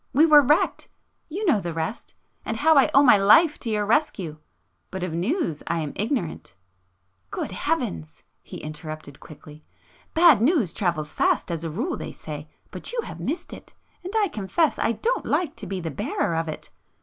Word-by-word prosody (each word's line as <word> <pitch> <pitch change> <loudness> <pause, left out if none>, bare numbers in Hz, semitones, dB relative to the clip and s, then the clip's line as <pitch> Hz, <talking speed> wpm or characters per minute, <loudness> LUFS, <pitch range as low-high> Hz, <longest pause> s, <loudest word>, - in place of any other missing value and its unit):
We 300 +5 +6
were 300 -2 +8
wrecked,... 295 +4 +1 0.4
you 390 +7 -4
know 285 - +3
the 170 -2 -5
rest, 165 +8 -4 0.3
and 220 - -3
how 315 +5 +4
I 275 - +5
owe 275 - +6
my 245 -6 +7
life 295 - +5
to 235 - -3
your 210 -1 0
rescue. 200 - 0 0.5
But 190 -1 -5
of 180 -3 -3
news 175 - -1
I 170 - 0
am 150 -2 -5
ignorant 210 - -3 0.4
..." 90 +1 -46
"Good - - -4
heavens!" 80 -2 -3 0.2
he - - -10
interrupted 155 -2 -8
quickly—"Bad 160 - 0
news 245 - +2
travels 170 -6 -2
fast - - +1
as 165 -1 -3
a 165 - -3
rule 240 - -3
they - - -7
say,—but - - -8
you 480 -1 -1
have - - -9
missed 325 - -4
it... - - -13 0.3
and 365 - -6
I 420 -2 +3
confess 265 - 0
I 230 - +1
don't 470 - -2
like 340 -6 0
to 215 -4 -7
be 190 0 -3
the 165 -2 -4
bearer 140 +4 -2
of 165 0 -1
it 155 - -7
200 Hz, 185 wpm, -24 LUFS, -, 0.5 s, were